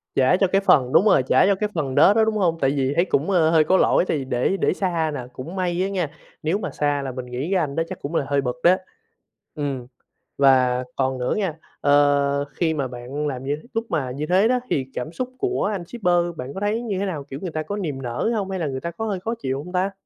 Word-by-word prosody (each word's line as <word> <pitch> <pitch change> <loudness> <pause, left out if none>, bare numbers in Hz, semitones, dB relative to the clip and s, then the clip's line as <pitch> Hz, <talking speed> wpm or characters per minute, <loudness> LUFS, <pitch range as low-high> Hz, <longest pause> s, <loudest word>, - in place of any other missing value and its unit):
Trả 135 +7 +4
cho 195 - +3
cái 195 +2 +2
phần 130 -9 +4
đúng 200 - +5
rồi, 190 -11 +5
trả 185 - +4
cho 200 0 +3
cái 210 +2 -2
phần 135 -5 -2
đó 200 - +7
đó, 220 0 +4
đúng 220 -1 0
hông? 170 -4 +1
Tại 135 0 +3
vì 135 -1 0
thấy 175 - +3
cũng, 155 +1 0
a, 165 -4 +4
hơi 160 -1 +5
có 190 +4 +3
lỗi - - +3
tại 155 - +1
vì 135 - -4
để 130 +10 0
để - - +1
xa 170 -5 -1
nà. 125 -3 -5
Cũng 165 +9 -7
may 180 -1 -1
á 195 - 0
nha, 180 -6 -1 0.3
nếu 165 +6 +1
mà - - -4
xa 145 -1 0
là 135 -1 -4
mình 125 0 -6
nghĩ 125 +7 -4
cái 190 - +3
anh 145 -3 -2
đó 165 - +1
chắc 185 -1 -7
cũng 155 +4 -5
là 140 - +1
hơi 140 -1 +1
bực 125 -2 -2
đó. 180 +2 +6 0.8
Ừm, 140 -5 -3 0.5
và 130 -2 +4
còn 130 -1 0
nữa 125 0 -1
nghe, 195 -5 0 0.3
ờ, 145 0 +3
khi 160 0 0
mà 140 -4 -1
bạn 125 +5 -5
làm 130 -2 -4
như 145 +2 -1 0.2
lúc 225 +1 -1
mà 135 -6 -1
như 145 +4 -3
thế 190 +5 +4
đó 250 0 +2
thì 135 -2 0
cảm 125 +6 -4
xúc 255 +7 -4
của 385 - -1
anh 185 -4 -4
shipper 180 -4 -1 0.2
bạn 130 +2 -6
có 190 - -5
thấy 210 +3 0
như 205 -5 -3
thế 200 - -1
nào, 155 -7 -4
kiểu, 140 0 -8
người 180 -4 -4
ta 155 0 -3
có 205 +4 -4
niềm 150 -9 -3
nở 120 - -2
hông? 195 -2 -2
Hay 190 -1 -3
là 160 - -1
người 130 -1 -3
ta 170 - -4
có 225 +6 -5
hơi 200 -4 -2
khó 225 +5 -3
chịu 135 +2 -2
hông 180 +2 -10
ta? 190 +2 +1
155 Hz, 275 wpm, -23 LUFS, 135-190 Hz, 0.8 s, đó